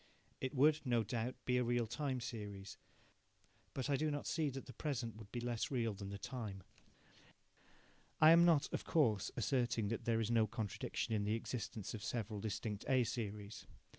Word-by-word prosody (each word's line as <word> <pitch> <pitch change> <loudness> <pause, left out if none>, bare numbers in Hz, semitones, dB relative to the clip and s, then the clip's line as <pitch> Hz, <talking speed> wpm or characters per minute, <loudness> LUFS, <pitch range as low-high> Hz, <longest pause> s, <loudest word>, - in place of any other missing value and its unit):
It 130 +1 -3
would, 150 +3 +5
no 120 -4 +2
doubt, 120 +3 -2
be 125 0 +2
a 125 - +3
real 120 0 +1
time 130 +3 -2
series, 105 -4 -6 1.0
but 130 -1 -1
I 145 - +3
do 155 +3 +1
not 145 -1 -2
see 160 -3 +1
that 135 0 -6
the 125 - -10
present 120 -4 -2
would 110 -2 -11
be 120 - -3
less 120 -1 -1
real 115 -5 0
than 100 0 -6
the 100 - -5
time. 105 -5 -5 1.6
I 155 +1 +9
am 170 +1 +8
not, 165 -4 +5
of - - -1
course, 115 - +2
asserting 120 -5 +1
that 115 - -3
there 115 -1 +2
is 115 0 0
no 115 -2 +4
contradiction 110 +1 -3
in 105 -2 +1
the 105 +2 +1
existence 110 -3 -4
of 105 -2 -5
several 110 -3 -2
distinct 105 0 -3
A 130 -2 +5
series. 105 -3 -4
115 Hz, 185 wpm, -38 LUFS, 105-130 Hz, 1.6 s, I